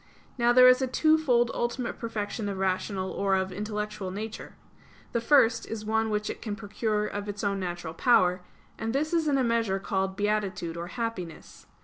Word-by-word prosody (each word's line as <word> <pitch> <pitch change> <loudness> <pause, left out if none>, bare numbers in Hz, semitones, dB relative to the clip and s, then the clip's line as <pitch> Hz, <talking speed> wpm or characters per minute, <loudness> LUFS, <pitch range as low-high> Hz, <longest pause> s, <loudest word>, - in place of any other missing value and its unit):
Now 240 -1 +3
there 255 +1 +8
is 255 +1 +6
a 260 - +1
twofold 260 -4 +3
ultimate 240 +1 -2
perfection 215 -2 -3
of 195 - -4
rational 190 0 -1
or 195 -1 +1
of 190 0 -1
intellectual 210 0 -4
nature. 210 +3 -6 0.6
The 235 - 0
first 230 -3 +4
is 220 -1 -5
one 220 +1 +1
which 210 0 -1
it - - -5
can 210 -3 -4
procure 210 0 -2
of 205 0 -5
its 205 +2 -5
own 200 -1 0
natural 175 -3 -4
power; 180 -3 +3 0.4
and 225 0 -2
this 310 +4 0
is 330 -2 +2
in 285 -2 +3
a 265 - +2
measure 230 -5 +1
called 190 -1 -2
beatitude 205 -5 -1
or 170 +1 -5
happiness. 185 -6 -6
210 Hz, 185 wpm, -28 LUFS, 195-235 Hz, 0.6 s, there